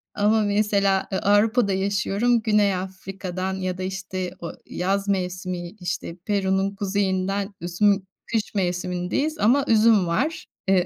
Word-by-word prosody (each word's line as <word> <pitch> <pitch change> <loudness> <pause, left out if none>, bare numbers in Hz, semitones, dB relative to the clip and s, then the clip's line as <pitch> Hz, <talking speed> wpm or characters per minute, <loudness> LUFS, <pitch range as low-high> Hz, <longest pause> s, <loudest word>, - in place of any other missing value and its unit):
Ama 215 +2 +3
mesela, 200 -2 +2
eee, 190 - 0
Avrupa'da 205 +1 +3
yaşıyorum, 200 +4 +1
Güney 210 -3 +3
Afrika'dan 185 0 -5
ya 185 -1 -3
da, 185 - -4
işte, 185 -1 -4
o 170 - -5
yaz 195 +2 -1
mevsimi, 180 -2 -2
işte, 175 -1 -4
Peru'nun 195 -1 0
kuzeyinden 195 0 -1
üzüm 190 +3 +2 0.3
kış 220 -1 -1
mevsimindeyiz 180 - -1
ama 265 +6 +4
üzüm 220 -4 +5
var, 285 - -1 0.2
eee 190 -2 +4
195 Hz, 125 wpm, -24 LUFS, 185-205 Hz, 0.3 s, üzüm